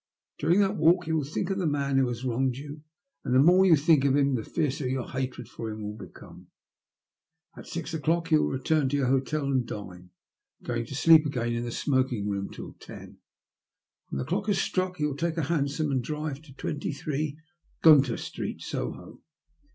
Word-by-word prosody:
During 170 +7 +3
that 200 0 +1
walk 175 +3 +4
you 160 0 0
will 150 - 0
think 165 +7 -3
of 195 - -1
the 180 - 0
man 140 -2 +1
who 130 - +3
has 120 +1 -4
wronged 125 +1 0
you, 145 +2 -8 0.4
and 125 -2 0
the - - +6
more 180 +6 +6
you 170 - +7
think 150 -1 +3
of 140 -1 +3
him 140 -1 +2
the 115 -4 -1
fiercer 145 -3 -2
your 130 -1 -2
hatred 130 -2 -4
for 115 - -6
him 110 0 -6
will 105 0 -4
become. - - -13 1.1
At - - -11
six 170 0 -5
o'clock 165 +2 0
you 155 -1 +5
will - - 0
return 135 +1 +1
to 145 - 0
your 140 - +1
hotel 135 +3 0
and 135 -2 +1
dine, 90 -5 -8 0.5
going 120 -1 -3
to 135 - -7
sleep 160 +2 +7
again 120 -4 -2
in 120 0 -2
the 120 - -4
smoking 130 -6 0
room 100 -1 -2
till - - -9
ten. - - -12 0.9
When - - -4
the 65 - -2
clock 210 - -2
has 205 -2 +2
struck 185 -1 -1
you 150 - +1
will 150 - -1
wake, 140 - -10 0.2
take - - -17
a 165 - 0
hansom, 145 0 0
and 130 -2 0
drive 150 0 -4
to 150 -4 -15
23, 145 0 -4
Great 150 +1 -2 0.4
Gunter 140 -7 +6
Street, - - -6
Soho. - - -6
140 Hz, 205 wpm, -27 LUFS, 125-155 Hz, 1.1 s, you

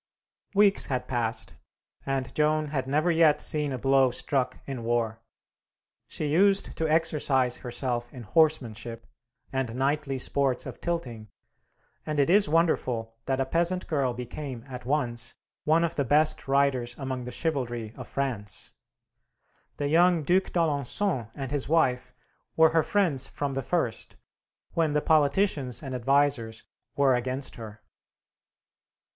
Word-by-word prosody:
Weeks 200 0 +4
had 130 -2 -2
passed, 115 -3 -2 0.5
and 135 -1 -2
Joan 155 0 +1
had 135 -3 -2
never 155 +5 +2
yet 160 -3 +4
seen 150 -2 0
a 130 - -2
blow 135 +1 +3
struck 125 +1 -1
in 130 -4 -5
war. 115 -1 -1 0.9
She 155 - -3
used 195 +6 +3
to 160 -1 0
exercise 145 -6 +1
herself 120 -1 -3
in 125 - -9
horsemanship, 120 -5 0 0.5
and 130 -3 -2
knightly 140 +1 0
sports 135 -1 +1
of - - -8
tilting, 120 -11 -4 0.7
and 150 -1 -2
it 140 +4 +3
is 200 -4 +5
wonderful 130 -9 +1
that 135 0 0
a 135 - +1
peasant 170 +5 0
girl 135 -6 0
became, 125 0 -6
at 125 -2 -8
once, 120 -5 -1 0.3
one 160 +2 +4
of 170 - -1
the 140 - +1
best 150 +4 +3
riders 135 -3 +1
among 130 -2 -4
the 125 - -6
chivalry 120 -7 -3
of - - -9
France. 120 -7 -4 1.0
The 145 - -1
young 170 +1 +4
Duc 185 +5 +3
d'Alençon 150 - -1
and 135 -2 -5
his 145 -2 -2
wife 130 -6 +2 0.4
were 160 0 +6
her 165 0 +4
friends 165 -7 0
from 145 -1 -3
the 135 - -2
first, 125 -6 -2 0.6
when 160 -3 +1
the 150 - +2
politicians 150 - +2
and 135 -2 -5
advisers 125 -3 +1 0.3
were 140 -2 +4
against 130 +2 -2
her. 110 -1 -10
135 Hz, 140 wpm, -27 LUFS, 125-155 Hz, 1.0 s, were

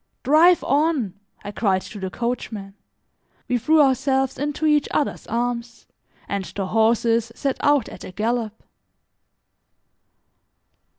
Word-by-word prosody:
"Drive 320 +6 +5
on," 285 - +1 0.3
I 205 - -6
cried 195 -3 0
to 210 - -9
the 190 -1 -4
coachman. 220 -3 -4 0.7
We 250 -1 0
threw 310 +5 +4
ourselves 265 0 +1
into 295 +2 -2
each 300 -2 +3
other's 290 - -2
arms, 235 0 -3 0.4
and 200 -1 -2
the 195 +1 -5
horses 225 +2 +2
set 275 -2 -2
out 290 -5 +3
at - - -10
a - - -8
gallop. 220 +2 -2
240 Hz, 120 wpm, -22 LUFS, 215-280 Hz, 0.7 s, Drive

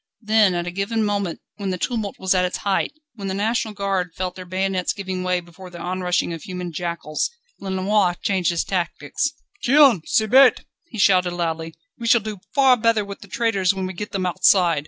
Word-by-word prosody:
Then 215 -3 +4
at 175 0 -2
a 175 - -4
given 200 +4 -1
moment, 200 -4 -2 0.2
when 200 -2 -3
the 185 - -2
tumult 215 +1 -2
was 190 0 +1
at 185 -1 +2
its 180 - -1
height, 200 -1 -1 0.2
when 200 -4 -6
the 190 - -2
National 220 +2 0
Guard 195 -4 -2
felt 185 -1 -3
their 185 - -9
bayonets 185 0 -1
giving 190 -2 -4
way 180 -1 0
before 175 +2 -13
this 175 -1 -10
onrushing 180 0 -1
tide 165 - -4
of - - -17
human 180 +1 -6
jackals, 170 -2 -2 0.3
Lenoir 190 -1 +1
changed 190 -3 +1
his 170 -1 0
tactics. 175 - -2 0.3
"Tiens! 270 - +6
c'est 220 - +2
bête!" 265 +3 +6 0.3
he 230 - -9
shouted 185 -3 +3
loudly, 165 -1 -3 0.2
"we 230 - -4
shall 235 - +6
do 210 -1 -6 0.2
far 265 -3 +5
better 225 -2 +2
with 200 0 -8
the 200 - -13
traitors 200 -4 +1
when 190 -1 -3
we 185 - -5
get 210 +3 -6
them 190 -2 -2
outside. 180 -2 +3
190 Hz, 205 wpm, -22 LUFS, 180-210 Hz, 0.3 s, Tiens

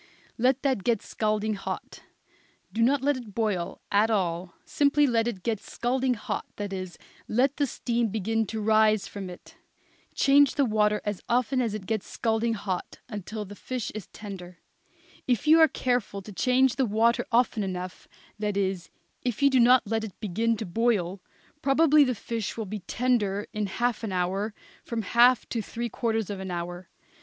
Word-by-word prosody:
Let 260 +2 +2
that 265 -8 +1
get 235 -4 +1
scalding 215 0 -1
hot; 195 - -6 0.7
do 230 - -1
not 265 +3 +3
let 285 -1 +2
it 220 -5 -10
boil 205 -7 -1
at 210 +2 +4
all; 180 -4 -1
simply 290 0 +3
let 235 -3 +2
it 195 -7 -4
get 225 -3 -1
scalding 250 +3 -1
hot 210 - -4
that 205 -1 -4
is, 185 -2 -5 0.3
let 260 +5 +2
the 285 -1 +1
steam 235 -2 -1
begin 220 +1 -1
to 220 +2 -4
rise 215 -1 +4
from 195 -2 -7
it. 180 - -13 0.6
Change 280 0 +5
the 280 - +3
water 210 -2 +2
as 205 -2 -3
often 255 +2 +2
as 225 -4 -1
it 205 -3 -6
gets 220 0 -2
scalding 225 0 0
hot, 195 -3 -4
until 210 +1 -5
the 205 - -10
fish 250 +3 -4
is 215 -4 -7
tender. 180 -4 -9 0.7
If 245 -5 +1
you 315 +2 +7
are 320 - +8
careful 245 -8 -1
to 210 - -9
change 255 +4 +3
the 265 -3 +2
water 225 +3 +2
often 235 -2 +2
enough, 185 -2 -5 0.3
that 210 -2 -1
is, 190 -3 -1 0.3
if 245 +1 -2
you 280 - +6
do 260 - +4
not 245 +2 +6
let 220 +1 -1
it 215 -4 -8
begin 225 +3 0
to 220 - -4
boil, 195 -2 0 0.4
probably 300 +2 +5
the 255 -3 0
fish 225 0 -4
will 220 - -3
be 210 +2 -5
tender 210 -1 0
in 210 -2 -1
half 240 +4 -1
an 215 - -3
hour 190 +4 -1 0.3
from 230 -2 -3
half 240 +4 +4
to 230 - -1
three 235 +3 -4
quarters 225 -2 -1
of 200 - -5
an 190 0 -5
hour. 175 0 -5
220 Hz, 180 wpm, -27 LUFS, 200-245 Hz, 0.7 s, are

